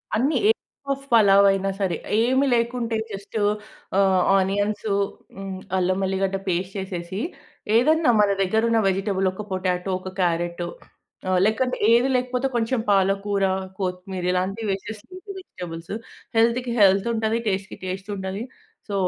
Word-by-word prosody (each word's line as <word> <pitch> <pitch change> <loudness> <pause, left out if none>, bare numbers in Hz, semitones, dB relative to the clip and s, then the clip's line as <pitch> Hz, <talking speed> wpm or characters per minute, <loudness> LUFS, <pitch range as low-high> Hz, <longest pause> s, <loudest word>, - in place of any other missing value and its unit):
అన్ని. 270 +8 +2
ఏ - - +9 0.4
పఫ్ 275 0 -2
పలావైనా 195 -2 +5
సరే. 185 -4 0 0.2
ఏమి 260 +4 +3
లేకుంటే, 235 -1 0 0.2
జస్టు 200 +2 -5 0.6
ఆహ్, 190 -2 +4 0.2
ఆనియన్సు 205 +2 0 0.4
హ్మ్. 195 -1 -6 0.2
అల్లం 185 0 +1
వెల్లిగడ్డ 190 0 0
పేస్ట్ 185 +1 -1
చేసేసి, 190 0 -4 0.6
ఏదన్నా 310 +4 +4
మన 205 - +3
దగ్గరున్న 220 +4 +2
వెజిటబుల్ 195 0 0
ఒక 200 - -6
పొటాటో 185 0 -1
ఒక 185 0 -7
క్యారట్టో 175 0 0 0.6
ఆహ్, 185 -1 +3
లేకంటే, 250 +4 +1 0.2
ఏదీ 240 +3 +4
లేకపోతే 250 +1 0
కొంచెం 235 +2 +1
పాలకూర, 195 +1 +2 0.4
కొత్తిమీర 180 0 -3
ఇలాంటివి 195 +4 -1
వేసేసి, 205 +2 -5
లీఫీ 370 +2 -9
వెజిటబుల్స్. 170 - -8 0.4
హెల్త్‌కి 235 +2 +2
హెల్తుంటది, 220 +3 +3
టెస్టుకి 195 0 -2
టెస్టుంటది. 190 +1 -4 0.5
సో, 205 - -5
195 Hz, 125 wpm, -24 LUFS, 190-230 Hz, 0.6 s, ఏ